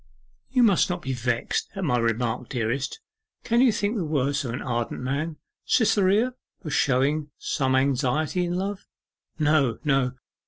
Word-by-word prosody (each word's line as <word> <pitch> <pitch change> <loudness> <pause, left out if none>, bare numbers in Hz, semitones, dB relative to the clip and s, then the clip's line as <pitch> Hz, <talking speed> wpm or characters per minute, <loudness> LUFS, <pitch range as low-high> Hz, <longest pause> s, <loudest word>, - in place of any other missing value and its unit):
'You 255 -2 +3
must 200 -6 +4
not 175 -1 -3
be 135 - -2
vexed 125 -1 -1
at 195 - -3
my 130 -7 +2
remark, 115 +1 -1
dearest. 125 - -2 0.4
Can 235 +1 +2
you 255 -2 +6
think 205 +2 -1
the 190 - -1
worse 145 -3 0
of 125 - -3
an 125 - -4
ardent 120 -2 -2
man, 145 +5 -2 0.3
Cytherea, 215 +2 +3 0.3
for 155 - -5
showing 140 +3 +1
some 130 -1 0
anxiety 140 +6 +1
in 175 0 -2
love?' 195 +2 -3 0.5
'No, 150 -5 +2
no. 135 -4 +2
145 Hz, 155 wpm, -25 LUFS, 125-180 Hz, 0.5 s, you